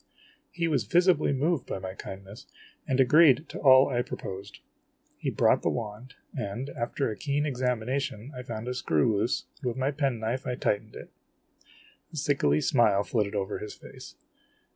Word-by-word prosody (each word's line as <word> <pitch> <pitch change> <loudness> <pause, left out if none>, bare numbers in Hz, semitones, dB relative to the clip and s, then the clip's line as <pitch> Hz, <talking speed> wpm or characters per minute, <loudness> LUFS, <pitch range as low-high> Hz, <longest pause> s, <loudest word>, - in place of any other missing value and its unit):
He 170 -1 -2
was 140 -9 +1
visibly 175 - +3
moved 145 +1 0
by - - -3
my 95 0 -6
kindness, 95 +2 -10 0.4
and 130 0 0
agreed 150 +2 +6
to - - -7
all 130 -1 +7
I 120 -2 0
proposed. 100 -5 -7 0.6
He - - -1
brought - - +3
the - - +1
wand, 115 +3 -5 0.2
and, 120 +2 -4
after 120 +2 -2
a - - -5
keen 145 +3 -1
examination, 125 -2 -2
I 125 - -5
found 115 -2 -6
a 125 - -1
screw 90 - +1
loose, 120 - -1 0.2
and 130 - -3
with 120 - -2
my 135 +2 +1
pen 140 -4 0
knife 115 +4 -3
I 125 - -1
tightened 110 -1 -1
it. - - -10 1.0
A 160 - -9
sickly 135 - +2
smile 105 -6 +3
flitted 105 -2 -1
over 100 0 -2
his 105 - -7
face. - - -12
125 Hz, 170 wpm, -28 LUFS, 105-140 Hz, 1.0 s, all